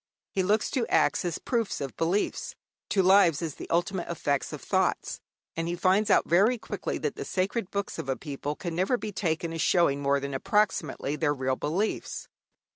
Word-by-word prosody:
He 195 Hz, -, 0 dB
looks 210 Hz, +4 st, +1 dB
to 240 Hz, -4 st, 0 dB
acts -, -, +2 dB
as 170 Hz, -2 st, -1 dB
proofs 230 Hz, -4 st, -1 dB
of 135 Hz, -2 st, -5 dB
beliefs, 175 Hz, +5 st, -1 dB, 0.3 s
to 195 Hz, -, +3 dB
lives 180 Hz, -5 st, +5 dB
as 160 Hz, -3 st, -3 dB
the -, -, -9 dB
ultimate 175 Hz, +2 st, 0 dB
effects 145 Hz, -4 st, -1 dB
of -, -, -6 dB
thoughts. -, -, 0 dB, 0.3 s
And 165 Hz, 0 st, -2 dB
he 175 Hz, -, -1 dB
finds 190 Hz, +4 st, +2 dB
out -, -, +5 dB
very 200 Hz, +9 st, +4 dB
quickly 225 Hz, -, -4 dB
that -, -, -3 dB
the -, -, -3 dB
sacred 190 Hz, +2 st, -1 dB
books 200 Hz, -1 st, -3 dB
of 135 Hz, -, -5 dB
a 130 Hz, -, 0 dB
people 145 Hz, +1 st, -4 dB
can 170 Hz, 0 st, -5 dB
never 190 Hz, +9 st, +1 dB
be 215 Hz, -, -5 dB
taken 165 Hz, -4 st, -1 dB
as 165 Hz, -, -2 dB
showing 145 Hz, -4 st, +3 dB
more 140 Hz, 0 st, +2 dB
than 140 Hz, 0 st, -5 dB
approximately 155 Hz, -, 0 dB
their 145 Hz, -2 st, +1 dB
real 130 Hz, -1 st, 0 dB
beliefs. 175 Hz, +11 st, -2 dB
175 Hz, 195 wpm, -28 LUFS, 145-200 Hz, 0.3 s, lives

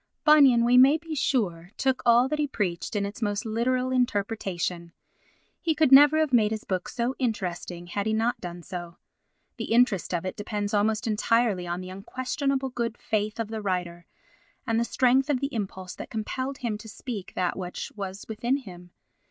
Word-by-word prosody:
Bunyan, 275 Hz, -7 st, +6 dB
we 250 Hz, +1 st, +6 dB
may 275 Hz, +4 st, +7 dB
be 325 Hz, 0 st, -8 dB
sure, 190 Hz, -, 0 dB
took 265 Hz, -1 st, +1 dB
all 240 Hz, +2 st, +6 dB
that 305 Hz, +2 st, -2 dB
he 295 Hz, -, +1 dB
preached 190 Hz, -7 st, -3 dB
in 200 Hz, -1 st, 0 dB
its 205 Hz, +4 st, -7 dB
most 205 Hz, +1 st, -1 dB
literal 250 Hz, +3 st, 0 dB
interpretation; 195 Hz, -8 st, -1 dB, 0.7 s
he 325 Hz, -3 st, 0 dB
could 310 Hz, -3 st, +3 dB
never 290 Hz, +3 st, +8 dB
have 310 Hz, -4 st, +1 dB
made 220 Hz, -3 st, +5 dB
his 220 Hz, -1 st, -4 dB
book 185 Hz, -2 st, -3 dB
so 245 Hz, +1 st, -1 dB
interesting 180 Hz, -7 st, -3 dB
had 200 Hz, +4 st, -3 dB
he 220 Hz, -, +1 dB
not 225 Hz, +2 st, 0 dB
done 175 Hz, -1 st, -7 dB
so. 175 Hz, -1 st, -7 dB, 0.6 s
The -, -, -3 dB
interest 230 Hz, -5 st, +2 dB
of 175 Hz, 0 st, -2 dB
it 185 Hz, -, -3 dB
depends 205 Hz, -1 st, -3 dB
almost 215 Hz, +3 st, +1 dB
entirely 220 Hz, -3 st, +1 dB
on 175 Hz, +1 st, -3 dB
the 185 Hz, 0 st, -8 dB
unquestionable 265 Hz, +6 st, -2 dB
good 235 Hz, -2 st, -3 dB
faith 215 Hz, +1 st, -2 dB
of 225 Hz, -2 st, -2 dB
the 220 Hz, -1 st, -4 dB
writer 180 Hz, -3 st, -3 dB, 0.6 s
and 225 Hz, -2 st, +1 dB
the 235 Hz, -, +1 dB
strength 260 Hz, +3 st, +2 dB
of 275 Hz, -4 st, +2 dB
the 275 Hz, +2 st, -3 dB
impulse 190 Hz, -4 st, -4 dB
that -, -, -8 dB
compelled 260 Hz, +5 st, -3 dB
him 220 Hz, -4 st, -3 dB
to 220 Hz, -, -10 dB
speak 215 Hz, -3 st, -7 dB
that 180 Hz, -1 st, 0 dB
which 180 Hz, -2 st, -5 dB
was 195 Hz, -1 st, -6 dB
within 235 Hz, +5 st, 0 dB
him. 180 Hz, -9 st, -11 dB
220 Hz, 185 wpm, -26 LUFS, 190-255 Hz, 0.7 s, never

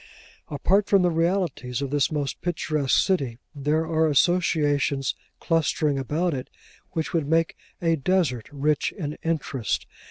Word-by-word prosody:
Apart 195 Hz, +8 st, +1 dB
from 195 Hz, -2 st, +4 dB
the 175 Hz, -, +3 dB
realities 165 Hz, -7 st, 0 dB
of 140 Hz, -1 st, -3 dB
this 145 Hz, +1 st, +2 dB
most 145 Hz, -3 st, -2 dB
picturesque 155 Hz, -5 st, 0 dB
city, 135 Hz, -, 0 dB, 0.2 s
there 150 Hz, +2 st, 0 dB
are 160 Hz, 0 st, +2 dB
associations 145 Hz, -3 st, +2 dB, 0.3 s
clustering 155 Hz, -3 st, +1 dB
about 155 Hz, +6 st, 0 dB
it 130 Hz, -1 st, -5 dB, 0.4 s
which 160 Hz, -3 st, -2 dB
would 160 Hz, -4 st, 0 dB
make 165 Hz, +1 st, +2 dB, 0.3 s
a 165 Hz, -1 st, +3 dB
desert 140 Hz, -7 st, 0 dB
rich 145 Hz, +1 st, 0 dB
in 150 Hz, -5 st, -4 dB
interest. 145 Hz, -8 st, -2 dB
155 Hz, 135 wpm, -25 LUFS, 140-165 Hz, 0.4 s, from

